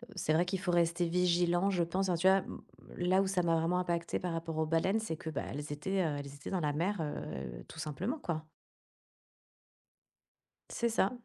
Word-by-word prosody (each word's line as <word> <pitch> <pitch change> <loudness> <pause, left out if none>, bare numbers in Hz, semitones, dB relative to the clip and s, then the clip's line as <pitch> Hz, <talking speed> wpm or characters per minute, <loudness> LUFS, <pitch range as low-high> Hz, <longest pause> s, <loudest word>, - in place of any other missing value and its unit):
c'est 160 -4 +1
vrai 170 +3 +4
qu'il 185 +1 -2
faut 180 0 -1
rester 170 0 +2
vigilant, 175 +1 +3
je 180 -3 +2
pense, 185 +3 0
hein? 180 - +3
Tu 170 +3 +2
vois? 190 0 +6
Mmh. - - -8 0.4
Là 185 +2 +3
où 195 - 0
ça 190 -2 +1
m'a 165 -1 +3
vraiment 165 +2 +1
impactée 170 -2 -1
par 180 -2 -2
rapport 165 -1 -3
aux 160 - +2
baleines, 165 +7 +2
c'est 220 -7 -3
que, 160 - -6
bah, 155 - -2
elles 145 +2 -5
étaient, 190 +7 -1
heu, 155 -3 0
elles 140 - -6
étaient 140 +1 -8
dans 190 - +1
la 150 -2 +1
mer, 180 +6 0
heu, 65 - -5
tout 160 - -10
simplement, 160 - -2
quoi! 160 - -3 2.3
C'est 235 - 0
ça. 215 -3 +2
170 Hz, 210 wpm, -33 LUFS, 160-185 Hz, 2.3 s, vois